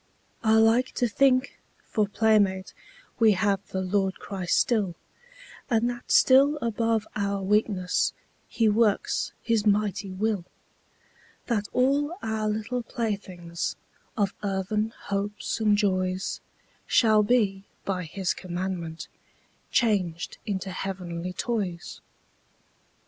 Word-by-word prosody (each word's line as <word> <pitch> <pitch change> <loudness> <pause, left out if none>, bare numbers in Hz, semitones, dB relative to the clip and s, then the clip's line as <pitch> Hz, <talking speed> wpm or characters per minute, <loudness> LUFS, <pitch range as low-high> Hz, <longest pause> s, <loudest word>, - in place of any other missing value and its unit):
I 220 0 +4
like 225 +3 +4
to 245 - +1
think, 255 +3 +2 0.2
for 215 -3 0
playmate 205 -3 +2 0.5
We 220 -2 +6
have 200 0 +1
the 190 - -3
Lord 190 0 0
Christ 185 -3 -1
still, 205 -7 +1 0.7
And 235 -1 +2
that 240 0 -10
still 275 +3 +6
above 230 -2 0
our 200 -1 -1
weakness 195 -2 +1 0.4
He 225 - +1
works 215 -1 +2
His 225 -3 +1
mighty 205 -1 +1
will, 200 0 -1 1.0
That 210 -4 -1
all 285 +6 +1
our 220 -1 -1
little 220 +4 -2
playthings 195 -8 -4 0.4
Of 200 -2 +1
earthen 210 +2 -1
hopes 205 +3 -3
and 210 -2 +3
joys 185 -2 0 0.5
Shall 215 -2 +5
be, 205 -3 +1 0.2
by 185 -2 -2
His 185 +3 -2
commandment, 175 -2 -5 0.6
Changed 185 -8 0
into 195 -2 -3
heavenly 180 -2 -4
toys. 190 -7 -3
205 Hz, 110 wpm, -26 LUFS, 190-225 Hz, 1.0 s, We